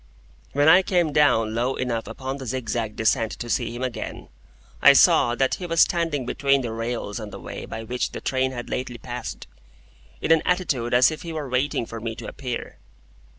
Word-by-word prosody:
When 145 +2 +3
I 180 +4 +8
came 175 -5 +1
down 125 -7 +3
low 120 +3 0
enough 115 -3 -2
upon 135 +1 -5
the 135 -2 -8
zigzag 115 -3 -3
descent 110 0 +1
to 120 - -7
see - - 0
him 120 +2 -5
again, 125 -3 -5 0.5
I - - +9
saw 120 0 +5
that 135 +1 +1
he 180 - -4
was 165 -1 +3
standing 165 -6 +1
between 140 +2 +2
the 120 -3 -4
rails 115 -1 -4
on 105 -2 -7
the - - -9
way - - -7
by 115 0 -6
which 125 +2 -2
the - - -6
train 130 0 0
had 120 -2 -6
lately 125 -1 -4
passed, - - -6 0.7
in - - -1
an 165 -1 +6
attitude 140 -10 0
as 125 +4 +6
if 155 - -6
he 170 -2 -6
were 155 -3 -4
waiting 125 -1 0
for 115 0 -7
me 115 0 -4
to - - -8
appear. 125 -3 -6
125 Hz, 200 wpm, -24 LUFS, 115-145 Hz, 0.7 s, I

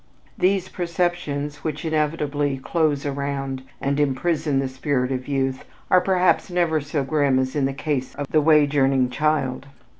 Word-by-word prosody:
These 185 0 +1
perceptions 170 -5 -2
which 155 0 -4
inevitably 150 -3 0
"close 150 0 0
around" 140 -1 -3 0.2
and 140 +1 -1
imprison 150 +1 0
the 135 0 +1
spirit 130 0 -1
of 130 -1 -3
youth 135 -2 -1 0.3
are 185 - +6
perhaps 185 0 +2
never 170 -3 +1
so 145 0 -2
grim 140 -2 +2
as 130 +1 -1
in 145 -2 +1
the 135 - 0
case 135 -2 -3
of 145 - -3
the 155 - +4
wage 150 -1 +4
earning 135 -2 +3
child. 140 -2 0
145 Hz, 155 wpm, -23 LUFS, 135-155 Hz, 0.3 s, are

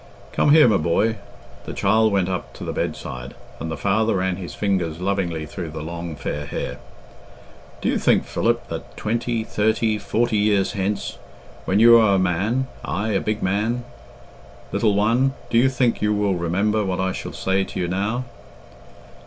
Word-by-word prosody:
"Come - - +2
here, 150 -2 +7
my 105 -4 +4
boy." 100 +8 +1 0.5
The - - -5
child 110 +2 +3
went 95 -3 +2
up 95 -1 -4
to - - -8
the - - -3
bedside, 60 -1 -4 0.2
and 80 - -4
the 80 - -4
father 110 +3 +1
ran 95 -1 0
his 90 -3 -7
fingers 90 -6 -1
lovingly 90 -4 -1
through 85 +1 -6
the 80 0 -6
long 85 0 -5
fair 75 0 -4
hair. - - -4 1.0
"Do - - 0
you - - +1
think, - - +3
Philip, - - 0
that - - -7
twenty, 115 +1 -1
thirty, 110 0 +1
forty 115 +2 0
years 105 -2 +2
hence, 100 +1 -3 0.5
when 95 - +2
you 115 +1 +9
are 105 -3 +4
a - - +3
man 95 +8 +1 0.2
aye, 105 +4 -2
a 100 -3 +1
big 110 0 -2
man, 105 +6 0 0.9
little 105 -3 +2
one 120 +6 +2 0.2
do 115 - +5
you 130 +2 +4
think 125 -3 +1
you 105 0 +2
will 105 -1 +1
remember 95 +5 0
what 95 -2 -2
I 95 0 +1
shall - - -6
say 95 +1 0
to - - -6
you 90 - 0
now?" 100 +7 -1
100 Hz, 180 wpm, -22 LUFS, 90-110 Hz, 1.0 s, you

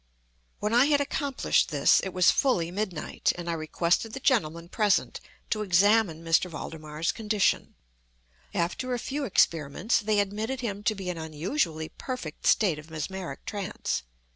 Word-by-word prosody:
When 210 +2 -2
I 245 +3 +6
had 290 -1 +3
accomplished 285 -1 +1
this, 145 -3 +4
it 190 - -3
was 180 -1 +5
fully 175 -11 +1
midnight, 185 -4 -1
and 175 -1 -7
I 170 - 0
requested 170 +6 0
the 265 - -4
gentlemen 170 - +1
present 210 +2 +1 0.3
to 215 - 0
examine 195 -3 +3
M. 165 - -4 0.2
Valdemar's 155 0 -4
condition. 210 -3 0 0.8
After 245 +9 -1
a - - -2
few 275 +4 -3
experiments, 170 - +2
they 210 -1 +1
admitted 215 +6 -2
him 205 -4 -3
to 215 - +2
be 190 -2 -4
an 170 - -6
unusually 160 - -2
perfect 250 - -6
state 180 -8 +3
of 155 +2 -13
mesmeric 175 +4 -5
trance. 200 -3 -3
190 Hz, 150 wpm, -27 LUFS, 165-225 Hz, 0.8 s, I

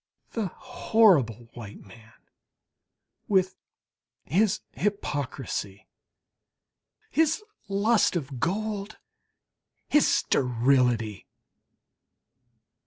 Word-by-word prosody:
The 220 -4 -2
horrible 175 - +2
white 110 -4 -10
man, 110 +3 -16 1.1
with 190 -2 +2 0.7
his 195 - +2
hypocrisy, 135 - -3 1.3
his 320 +6 +2 0.2
lust 205 +2 +2
of 140 -6 -4
gold, 205 - -2 0.9
his 295 - +4
sterility! 120 -4 +1
170 Hz, 60 wpm, -27 LUFS, -, 1.3 s, his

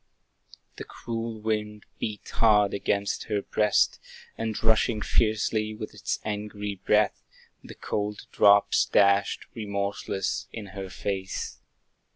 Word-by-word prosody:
The - - -5
cruel 115 -1 -5
wind 105 -1 -2
beat 105 -2 -4
hard 105 -3 +4
against 100 0 -1
her 105 -2 -1
breast, 105 -1 +2 0.4
And 110 -2 -3
rushing 110 0 +2
fiercely, 110 -1 +1
with 110 0 -7
its - - -2
angry 105 -1 -3
breath, 105 0 +3 0.4
The - - -10
cold 105 0 -3
drops 100 0 +5
dashed, 100 0 +3
remorseless, 100 -2 -2
in 105 -3 -7
her 95 -2 -6
face. 95 0 -4
105 Hz, 115 wpm, -27 LUFS, 100-110 Hz, 0.4 s, drops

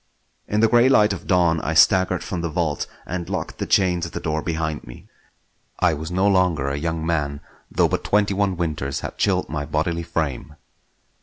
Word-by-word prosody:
In 105 +1 0
the 115 - +6
grey 120 +3 +5
light 105 -6 +4
of 95 - -8
dawn 85 -3 +3
I 80 - -2
staggered 95 +1 +4
from 90 -3 -4
the 85 - -2
vault 80 -3 -1 0.2
and 90 -1 -5
locked - - -4
the - - -3
chain 90 -3 +3
of - - -5
the - - -3
door 80 0 -2
behind 80 -2 -3
me. - - -12 0.7
I 80 - +3
was 80 +2 -5
no 95 +2 0
longer 90 -8 +2
a 70 - -2
young 80 0 -2
man, 75 -4 -1 0.3
though - - +2
but - - -2
twenty 100 -1 +2
one 95 -2 0
winters 75 -5 -2
had - - -7
chilled - - +1
my 75 -1 -3
bodily 80 +3 -1
frame. 75 -3 -3
85 Hz, 200 wpm, -22 LUFS, 80-95 Hz, 0.7 s, the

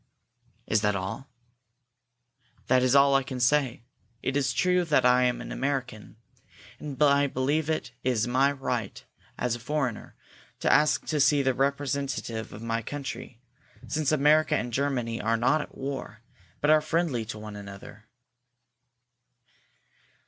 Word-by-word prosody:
"Is 110 -1 +1
that 105 -1 +1
all?" 100 +9 -5 1.4
"That 130 0 +3
is 130 +1 +3
all 140 0 +6
I 135 - +4
can 130 -1 -6
say. 125 -1 +1 0.4
It 135 - -1
is 140 -2 +1
true 180 0 +2
that 150 -6 +2
I 125 0 +5
am 125 -1 0
an - - -8
American, 130 -7 -3 0.6
and 140 -3 -7
I 140 0 +4
believe 145 +4 -1
it 155 -6 -2
is 120 -3 +1
my 130 +3 +3
right, 125 -6 -4 0.3
as 125 -2 -1
a - - -8
foreigner, 130 -2 -3 0.4
to - - +3
ask 150 0 +3
to 155 - -1
see 145 0 +4
the 130 -1 +2
representative 135 -4 -2
of 110 - -9
my 115 0 -1
country, 130 -2 -7 0.5
since 155 -2 0
America 155 +1 +4
and 125 -1 -3
Germany 125 -4 -1
are 115 +1 +1
not 125 +6 +2
at - - -10
war, 135 -5 -6 0.4
but 150 - +3
are 155 0 +5
friendly 155 -6 0
one 105 0 -8
to 105 - -8
the 100 0 -9
other." 100 +2 -12
130 Hz, 150 wpm, -27 LUFS, 115-145 Hz, 1.4 s, all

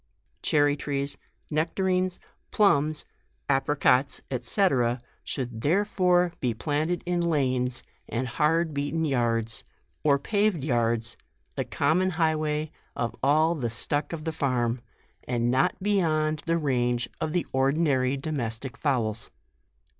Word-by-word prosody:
Cherry 145 -1 +3
trees, 140 -1 -2 0.4
necta 160 +5 0
rines, 185 -1 +1 0.3
plumbs, 155 -7 +3 0.4
apricots, 135 -1 +2 0.2
&c. 195 - +3 0.6
should 120 -5 -4
therefore 180 - +2
be 120 -3 -1
planted 155 +7 -1
in 175 0 0
lanes 130 -6 +1 0.3
and 125 +2 -2
hard 155 +5 +1
beaten 145 +3 -1
yards, 115 -5 0 0.4
or 140 -2 +4
paved 200 0 +1
yards, 115 -4 +1 0.4
the - - -1
common 165 +6 +2
highway 155 -2 0 0.2
of 120 -1 -2
all 155 +4 +4
the 130 -8 -2
stuck 145 +6 -1
of 165 -2 -5
the 160 - 0
farm, 125 -5 0 0.5
and 120 -1 +1
not 130 +2 +2
beyond 155 -7 +1
the 165 0 +2
range 125 -5 0
of 155 - -1
the 175 +1 0
ordinary 135 -1 +2
domestic 130 -4 -4
fowls. 120 -7 -1
145 Hz, 120 wpm, -27 LUFS, 125-165 Hz, 0.6 s, or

